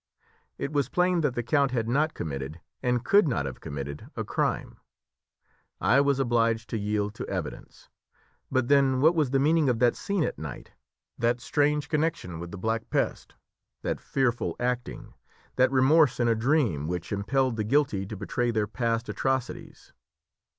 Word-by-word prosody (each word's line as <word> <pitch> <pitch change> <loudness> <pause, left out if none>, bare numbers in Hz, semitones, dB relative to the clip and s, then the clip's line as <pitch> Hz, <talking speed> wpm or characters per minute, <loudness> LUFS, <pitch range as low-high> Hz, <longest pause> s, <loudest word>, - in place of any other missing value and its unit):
It 140 - -4
was 145 -2 +1
plain 180 -1 +2
that 145 -5 0
the 120 - -1
count 140 +2 +2
had 115 -3 -1
not 150 +6 +1
committed, 70 +1 -5 0.2
and 125 -1 0
could 200 -3 +5
not 100 - 0
have 65 -2 -6
committed, 70 +1 -6
a - - -2
crime. - - -2 1.0
I 140 - +4
was 140 -1 +2
obliged 115 -3 +1
to 115 - -1
yield 105 0 -1
to - - -6
evidence. - - -6 0.6
But, 130 -2 +1
then, 135 -2 +4
what 160 +4 +6
was 155 -6 +1
the 135 - +2
meaning 150 +1 +3
of 120 - +1
that 120 0 +3
scene 200 -4 -1
at - - -3
night, 75 -5 -8 0.5
that 120 +1 +1
strange 145 +3 +1
connection 150 - -1
with 85 0 -6
the 100 - -8
Black 110 +4 -2
Pest, - - -2 0.5
that - - -2
fearful 125 -3 0
acting, 125 0 -3 0.4
that 130 0 +4
remorse 135 +1 +4
in 120 - +2
a 115 - +4
dream, 115 - +1
which 90 0 -4
impelled 125 +5 0
the 110 - -1
guilty 110 -5 +1
to 110 - -7
betray 120 +5 -1
their 110 -3 +1
past 115 +2 -1
atrocities? 130 -2 -3
125 Hz, 170 wpm, -27 LUFS, 105-140 Hz, 1.0 s, what